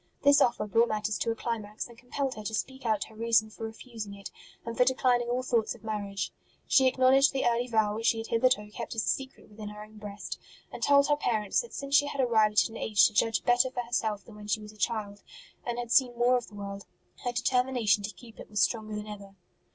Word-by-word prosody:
This 285 +1 +6
offer 235 -4 +2
brought 230 +3 +3
matters 215 0 -1
to 230 - -1
a 225 - 0
climax, 220 -2 -4
and 235 - -15
compelled 255 +3 -3
her 215 - -8
to 220 - -2
speak 265 +2 -4
out 215 -2 +1
her 220 - -14
reason 225 -1 +2
for 225 - -7
refusing 220 -2 -8
it, 200 0 -9 0.3
and 230 0 -5
for 250 - +5
declining 250 -1 +2
all 250 +1 0
thoughts 235 -4 0
of - - -18
marriage. 205 -2 -3 0.3
She 265 -1 +5
acknowledged 260 +2 +4
the 270 - 0
early 240 +1 +1
vow 220 -3 +2
which 225 +2 -2
she 225 - +3
had 225 - -4
hitherto 230 -3 +1
kept 235 +1 -6
as 220 - -1
a - - -7
secret 270 0 -3
within 210 0 -9
her 210 0 -9
own 215 0 -15
breast, 205 -1 -7 0.3
and - - -8
told 280 0 +5
her 295 - +3
parents 220 - 0
that 475 - -11
since 275 0 -1
she 285 - +5
had 285 - -6
arrived 220 -4 +4
at - - -4
an 225 - -9
age 210 -2 +4
to 215 - +2
judge 225 -1 +2
better 245 +1 +3
for 250 -1 -3
herself 220 -4 -2
than 225 - -13
when 210 0 -11
she 210 - 0
was 210 0 -10
a - - -19
child, 210 -2 -2 0.4
and 240 -1 -3
had 240 -1 -4
seen 245 -2 +4
more 245 +1 +4
of 245 -2 -2
the 210 - -14
world, 200 -1 -7 0.4
her 245 - -1
determination 250 -3 +2
to 200 +1 -4
keep 225 +3 -15
it - - -10
was 210 -1 -2
stronger 215 +1 0
than 210 0 -5
ever. 200 -2 -10
225 Hz, 245 wpm, -29 LUFS, 210-250 Hz, 0.4 s, This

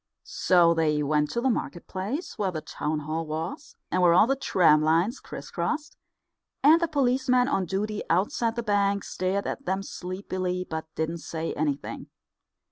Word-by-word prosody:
So 175 -2 +3
they 155 -2 +1
went 150 0 +1
to 235 - -2
the 265 - +2
market 175 -6 -4
place, 215 - -4
where 200 -2 0
the 165 -4 -3
Town 150 +1 -3
Hall 155 +2 -3
was, 155 +1 -5 0.2
and 185 - +1
where 170 -1 +5
all 185 - +7
the 270 +3 +1
tram 170 - +4
lines 165 - +2
criss - - -9
crossed; 300 -1 -2 0.7
and 315 +4 +7
the 335 - +2
policeman 255 -3 +2
on 195 -10 0
duty 210 +4 -2
outside 225 - +1
the 235 - -2
Bank 200 -2 +1
stared 190 +2 -2
at 275 - -4
them 190 -2 -1
sleepily, 185 -1 -4
but 160 0 -5
didn't 160 +2 -2
say 160 0 -4
anything. 145 -2 -3
185 Hz, 170 wpm, -26 LUFS, 160-235 Hz, 0.7 s, all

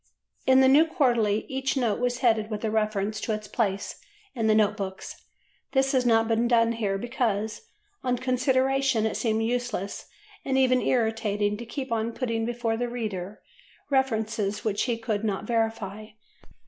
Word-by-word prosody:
In 260 0 +6
the 265 - +6
New 295 +5 +6
Quarterly 235 -9 +1
each 265 +1 -2
note 235 -5 +1
was 245 0 -1
headed 220 -2 +3
with 215 0 -4
a 215 - 0
reference 215 -1 -1
to 220 - -1
its 210 0 -5
place 200 -4 -2 0.3
in 225 -4 -1
the 215 - +4
Note 210 -1 +3
Books. 190 -2 -7 0.5
This 270 0 +3
has 255 -3 +2
not 225 -1 +4
been 230 +1 +2
done 230 -1 +3
here 210 -4 -1
because, 220 -2 -2 0.3
on 250 -1 0
consideration, 260 -1 +1
it 220 - -1
seemed 225 -1 0
useless, 235 -4 -3 0.4
and 265 -1 0
even 255 -1 +4
irritating, 220 -4 0
to 235 +1 -8
keep 265 +1 -5
on 230 0 -1
putting 230 -3 -2
before 235 -2 -1
the 245 +1 -2
reader 210 -5 -5 0.5
references 220 -6 0
which 210 -2 0
he 240 -2 -1
could 220 -2 -2
not 205 -2 -2
verify. 220 -2 -2
225 Hz, 165 wpm, -26 LUFS, 215-250 Hz, 0.5 s, In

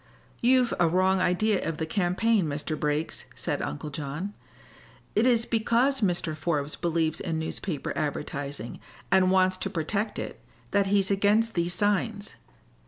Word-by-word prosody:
"You've 250 0 +4
a 175 - +5
wrong 185 +2 +3
idea 195 +3 +2
of 165 -2 -2
the 160 - -1
campaign, 190 +3 +1
Mr. 150 +2 -3
Briggs," 150 +1 -2
said - - -2
Uncle 75 - -4
John. 150 +7 -4 0.8
"It 220 +4 +4
is 235 -2 +4
because 235 +4 +2
Mr. 175 -5 0
Forbes 150 -2 -1
believes 165 -2 0
in 165 -4 -2
newspaper 160 0 -3
advertising, 140 -4 -4 0.3
and 190 0 +5
wants 185 0 +3
to 195 - -3
protect 200 +4 -2
it, - - -6 0.3
that 200 -1 +3
he's 195 0 +2
against 210 +3 +3
these 175 0 0
signs. 205 +1 0
185 Hz, 145 wpm, -27 LUFS, 160-205 Hz, 0.8 s, a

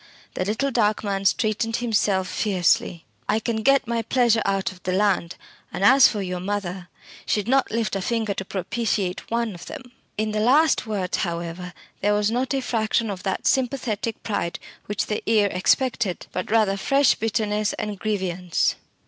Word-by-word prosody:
the - - -2
little 220 +8 -1
dark 215 -3 +1
man 195 -2 -2
straightened 225 +2 +1
himself 210 -5 +1
fiercely 180 -3 0 0.2
"I 215 - +3
can 225 0 -2
get 275 +5 +3
my 235 0 0
pleasure 230 -1 +2
out 195 -1 0
of 185 -1 -15
the 185 - -2
land; 190 -3 +1 0.4
and 195 - -4
as 265 +5 +8
for 205 -3 -3
your 180 -1 -3
mother, 185 -2 -4 0.4
she'd 210 -1 0
not 270 +1 +2
lift 225 -3 -1
a 195 - -1
finger 220 0 -1
to 195 - -4
propitiate 195 0 -2
one 230 -2 -1
of 175 - -11
them!" 265 -5 -9 0.3
In 215 0 -1
the 215 - -1
last 275 +4 +3
words, 195 -4 -2
however, 170 0 -4 0.3
there 205 +1 +2
was 210 +1 +1
not 255 +3 0
a 270 - 0
fraction 225 -2 0
of 185 -2 -6
that 190 -1 -3
sympathetic 235 -4 -1
pride 190 -5 -2 0.3
which 205 -1 -1
the 210 - -2
ear 210 -3 +4
expected, 200 0 +1
but 185 - -4
rather 210 -3 +2
fresh 275 +6 +3
bitterness 215 -1 -1
and 210 -2 -4
grievance. 185 -4 -1
210 Hz, 175 wpm, -23 LUFS, 190-230 Hz, 0.4 s, as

